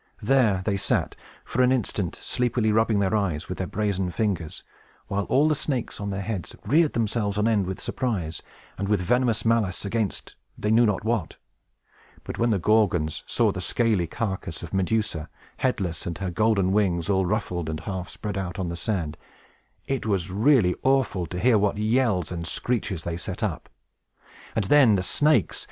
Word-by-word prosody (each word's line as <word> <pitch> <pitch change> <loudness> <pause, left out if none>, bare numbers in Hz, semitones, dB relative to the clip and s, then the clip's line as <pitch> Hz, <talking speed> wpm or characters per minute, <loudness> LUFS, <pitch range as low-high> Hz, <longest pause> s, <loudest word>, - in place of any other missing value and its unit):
There 110 -6 +3
they 100 -2 +1
sat, - - 0 0.3
for 125 - 0
an 125 0 +4
instant, 105 -7 -1
sleepily 120 -3 0
rubbing 110 0 +3
their 100 +1 +1
eyes 90 -7 -1
with 90 - -5
their 95 - -2
brazen 100 -3 -1
fingers, 90 -4 -2 0.4
while 100 0 -2
all 145 +4 +3
the 155 - +3
snakes 140 -7 -3
on 100 - -3
their 95 0 -3
heads 100 -4 -4
reared 150 +7 +3
themselves 105 -3 -1
on 105 +1 +2
end 105 -5 +2
with 95 - -4
surprise, 90 -11 -3 0.4
and 100 - -2
with 105 -2 +3
venomous 120 +4 +1
malice 110 -5 +1
against 105 -1 -2 0.2
they 105 - -1
knew 115 +1 +5
not 105 -2 0
what. 115 -2 -1 0.9
But - - -7
when 120 - +3
the 105 - +2
Gorgons 90 -5 +2
saw - - +2
the - - -5
scaly 110 -7 +1
carcass 95 -4 -4
of 85 - -8
Medusa, 95 -4 -1 0.3
headless, 95 -12 -1
and 85 -1 -3
her 95 -1 -3
golden 100 0 +2
wings 95 -5 +1
all 95 -2 +2
ruffled, 90 -5 -2
and 80 0 -4
half 90 -1 -5
spread 100 +3 -4
out 90 -2 -4
on 90 -3 -2
the 85 - -4
sand, 85 -4 -2 0.7
it 135 -4 -2
was 95 -3 0
really 105 -2 +4
awful 130 -10 +1
to 90 - -6
hear 115 +3 +4
what 100 0 +1
yells 110 - +1
and 85 -2 -4
screeches 105 -6 -1
they 85 -1 -3
set 85 - -5
up. - - -3 0.9
And 110 - +1
then 125 -1 +6
the 95 - 0
snakes! 150 - +2
100 Hz, 180 wpm, -25 LUFS, 90-115 Hz, 0.9 s, then